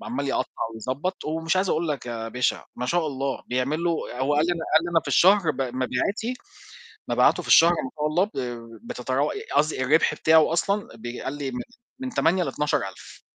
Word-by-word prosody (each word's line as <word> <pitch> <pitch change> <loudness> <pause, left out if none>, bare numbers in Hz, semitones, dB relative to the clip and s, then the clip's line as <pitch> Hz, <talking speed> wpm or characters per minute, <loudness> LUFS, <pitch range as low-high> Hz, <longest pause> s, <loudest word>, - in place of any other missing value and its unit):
ب 230 - -11
عمّال 235 - -3
يقطّع - - -1 0.2
ويضبط، 135 - -4
ومش 160 +3 -1
عايز 190 0 +1
أقول 160 +1 0
لك 140 -5 -3
يا 115 -1 -4
باشا 125 +1 -1
ما 125 - -3
شاء 170 +2 +1
الله 135 -1 -3
بيعمله 145 +7 0 0.2
آآ، 125 - -6
هو 145 +2 +1
قال 150 +3 +3
لي 175 - +1
أنا 165 -2 -4
قال 160 +2 +5
لي 175 - -3
أنا 165 - +3
في - - -9
الشهر 190 -2 +5
ب 135 -2 -5
مبيعاتي 130 - -2 0.7
مبيعاته - - +3
في - - -11
الشهر 170 +1 +7
ما 130 -6 -3
شاء 150 - 0
الله 175 +5 +2
ب 210 - -9 0.6
بتتراو 130 +4 -1
ي - - -6
قصدي 145 -2 +2
الرِبح 155 +5 +3
بتاعه 160 0 +4
أصلًا 200 +4 0
بي 120 +2 -7
قال 135 - -3
لي 140 -2 -3
من 125 -1 -5 0.4
من 260 -1 -4
8 180 -2 +2
ل12000 145 - -3
150 Hz, 205 wpm, -25 LUFS, 130-175 Hz, 0.7 s, الشهر